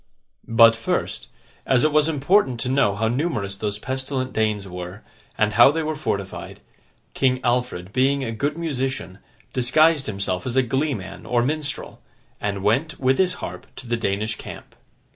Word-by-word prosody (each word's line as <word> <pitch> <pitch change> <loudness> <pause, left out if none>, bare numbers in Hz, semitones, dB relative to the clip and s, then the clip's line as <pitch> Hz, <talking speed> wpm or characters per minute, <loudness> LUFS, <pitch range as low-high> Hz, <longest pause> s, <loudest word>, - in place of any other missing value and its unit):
But, 115 0 +6
first, 115 - -2 0.4
as 125 -2 +3
it 155 - +3
was 150 +1 +3
important 145 - +2
to 125 - +1
know 130 -6 +2
how 110 +2 0
numerous 115 - -1
those 105 +1 -3
pestilent 130 +2 -3
Danes 105 -2 0
were, 90 +2 -8 0.3
and 105 -1 +2
how 120 +4 +8
they 160 +3 -1
were 155 0 -2
fortified, 100 -10 -4 0.5
King 130 -1 +2
Alfred, 120 -7 -1
being 135 +2 +2
a 115 - -3
good 145 +8 -2
musician, 135 - -3 0.3
disguised 140 +4 +3
himself 95 -2 -2
as 125 - -3
a 130 - +4
glee 135 +4 0
man 95 -2 -9
or 120 -1 +2
minstrel, 145 - -3 0.4
and 100 -1 -3
went, 135 +10 +1
with 130 0 +2
his 180 -1 +2
harp, - - -8
to - - -9
the 120 0 0
Danish 110 -1 -1
camp. - - -10
125 Hz, 165 wpm, -23 LUFS, 105-140 Hz, 0.5 s, how